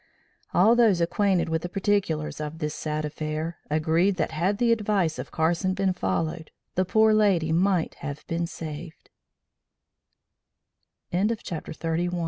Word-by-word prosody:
All 215 +6 +5
those 225 -7 +4
acquainted 185 +1 +1
with 160 0 -1
the 175 - -5
particulars 185 -6 -1
of 150 +1 -5
this 150 -2 -3
sad 155 0 -3
affair 155 +2 -4
agreed 160 +5 +2
that 170 - -1
had 185 +6 0
the 235 +1 +3
advice 205 -7 +1
of - - -5
Carson 170 +4 0
been 195 -1 +1
followed 160 - -2 0.2
the 185 - +1
poor 220 +3 +4
lady 195 -7 +3
might 180 0 +2
have 145 0 -6
been 170 0 -2
save 160 0 -7
170 Hz, 125 wpm, -26 LUFS, 155-195 Hz, 0.2 s, All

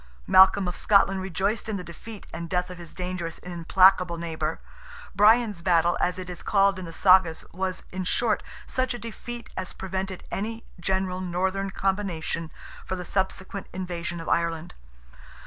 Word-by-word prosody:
Malcolm 190 - +6
of 180 - -3
Scotland 195 -2 +3
rejoiced 195 +4 -1
in 210 - -1
the 180 - -6
defeat 200 +5 -10
and 170 0 -5
death 180 +1 0
of 180 - -9
his 170 -2 -9
dangerous 180 -2 -4
and 180 - -9
implacable 180 +1 +4
neighbour. 160 -1 -3 0.6
"Brian's 210 -2 +5
battle," 175 -1 +3
as 180 0 +1
it 185 -1 -6
is 180 -1 -7
called 195 -1 +3
in 185 - -6
the 165 - -8
Sagas, 180 -2 +4
was, 185 +1 -2
in 185 0 -3
short, 220 +3 +1 0.2
such 255 -1 -1
a - - -5
defeat 235 +2 -7
as 185 0 -4
prevented 190 0 -4
any 225 +3 -3 0.2
general 185 +1 -1
northern 190 +2 -1
combination 190 -5 -2 0.3
for 185 - -3
the 180 -1 -6
subsequent 190 +1 -2
invasion 175 -2 -4
of 165 - -7
Ireland. 170 -1 0
185 Hz, 165 wpm, -26 LUFS, 175-195 Hz, 0.6 s, Malcolm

